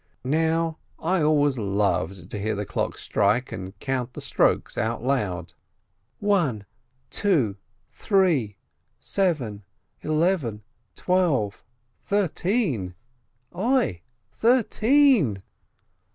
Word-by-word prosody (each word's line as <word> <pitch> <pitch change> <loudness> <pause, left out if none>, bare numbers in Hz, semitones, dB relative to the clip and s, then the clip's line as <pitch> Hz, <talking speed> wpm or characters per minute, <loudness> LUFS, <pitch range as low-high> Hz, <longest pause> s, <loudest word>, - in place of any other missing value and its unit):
Now 160 +3 0 0.2
I 175 +2 0
always 145 -3 +2
loved 100 -3 -1
to 105 - -4
hear 110 +2 -1
the 105 +1 -3
clock - - -2
strike 120 +5 +1
and 95 +2 -7
count 130 -2 -2
the - - -7
strokes - - +1
out 115 +1 -2
loud: 95 - -1 0.6
"One 150 - +1 0.2
— 130 0 -44
two 140 - +1
— 115 +1 -43
three 165 - +1 0.2
— - - -48
seven 135 - -1 0.2
— - - -46
eleven 155 - 0 0.2
— 115 -6 -46
twelve 165 - 0 0.2
— 120 0 -45
thir 200 -3 +1
teen! 150 - -1 0.6
Oi! 210 - +1 0.3
Thirteen?" 235 - +3
130 Hz, 115 wpm, -25 LUFS, -, 0.6 s, Thirteen